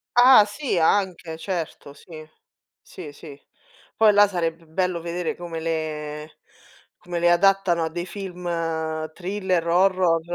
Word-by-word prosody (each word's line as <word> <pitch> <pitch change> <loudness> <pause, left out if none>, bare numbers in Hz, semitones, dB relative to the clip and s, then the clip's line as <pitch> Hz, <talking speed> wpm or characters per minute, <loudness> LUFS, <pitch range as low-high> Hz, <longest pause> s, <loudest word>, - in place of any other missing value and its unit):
Ah 245 -2 +8
sì, 225 +1 -3
anche, 170 -1 0
certo, 165 -5 -5
sì. 155 +1 -12 0.5
Sì, 160 -5 -10
sì. 145 -1 -12 0.6
Poi 220 -1 +5
là 205 0 +6
sarebbe 165 -3 -3
bello 175 +1 -2
vedere 170 0 -3
come 170 -2 -6
le 155 -1 -5 0.6
come 175 -1 -5
le 175 0 +3
adattano 180 -2 +3
a - - -3
dei 175 +2 -5
film 185 -2 -8 0.7
thriller, 185 -1 -2
o 170 - +2
horror. 185 -4 +2
175 Hz, 135 wpm, -23 LUFS, 160-190 Hz, 0.7 s, Ah